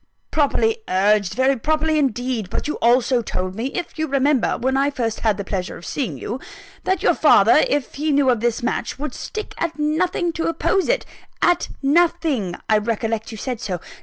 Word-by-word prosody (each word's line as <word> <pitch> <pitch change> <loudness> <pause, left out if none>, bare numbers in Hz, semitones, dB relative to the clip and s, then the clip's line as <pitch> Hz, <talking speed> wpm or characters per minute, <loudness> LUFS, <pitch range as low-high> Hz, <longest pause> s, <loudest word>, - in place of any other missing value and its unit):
"Properly 440 - +1
urged 200 0 +2
very 265 +2 +3
properly, 310 +4 +1
indeed. 245 -6 -1
But - - -3
you 300 - -1
also 245 +1 +3
told 185 -4 -3
me, 225 +6 -3
if 335 +3 -5
you 315 - 0
remember, 275 -2 +2
when 260 +2 0
I 275 +1 +2
first 240 -6 -2
had 215 -3 +1
the 200 - -3
pleasure 190 -2 -4
of - - -12
seeing 275 -4 -3
you, 240 +5 -5 0.5
that 375 0 0
your - - +4
father, - - +5
if 290 - -1
he 305 +2 -1
knew 280 -2 +4
of 240 - 0
this 235 +1 -1
match, - - -2
would 300 +2 -4
stick 430 -1 -6
at 335 -1 -2
nothing 335 +3 0
to 330 - -2
oppose 370 +5 0
it - - +1 0.3
at 350 0 +2
nothing 300 - +2
I 215 -1 +4
recollect 225 0 -2
you 220 - -7
said 245 +1 -4
so. 185 -4 -3
265 Hz, 195 wpm, -21 LUFS, 225-315 Hz, 0.5 s, father